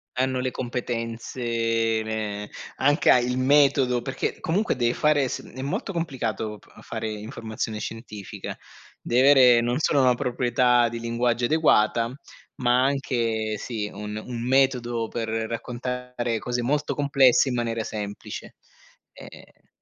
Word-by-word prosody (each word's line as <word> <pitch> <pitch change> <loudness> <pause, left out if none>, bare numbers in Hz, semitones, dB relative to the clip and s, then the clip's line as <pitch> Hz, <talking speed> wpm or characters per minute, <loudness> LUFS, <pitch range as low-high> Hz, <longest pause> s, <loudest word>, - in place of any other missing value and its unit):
Hanno 130 0 0
le 130 0 -1
competenze, 120 -1 -4 0.6
ehm, 105 -2 -4 0.3
anche 145 +3 +2
a - - +8
il 125 +1 0
metodo 135 -3 +3
perché 135 - -3
comunque, 190 +3 0
deve 120 -1 +1
fare 150 -3 +2
s - - -4
è 130 - -9
molto 145 +7 -3
complicato 115 - -3
p - - -23
fare 110 - -4
informazione 110 0 -5
scientifica. 110 -4 -7 0.5
Devi 125 +2 +2
avere 125 -4 +7
non 120 +4 0
solo 145 -3 +3
una 125 -1 +5
proprietà 120 0 +2
di 115 0 -5
linguaggio 120 +1 0
adeguata, 120 -6 +3 0.4
ma 125 -1 +3
anche 115 -5 0
sì, 105 -3 -4
un 105 +1 -6
un 120 -1 -5
metodo 125 -4 +2
per 115 -1 -4
raccontare 120 +1 -3
cose 125 +2 -2
molto 145 +4 0
complesse 140 -2 +4
in 125 - -2
maniera 115 -1 -1
semplice. 105 -1 -6 0.6
Ehm - - -14
120 Hz, 135 wpm, -25 LUFS, 115-130 Hz, 0.6 s, a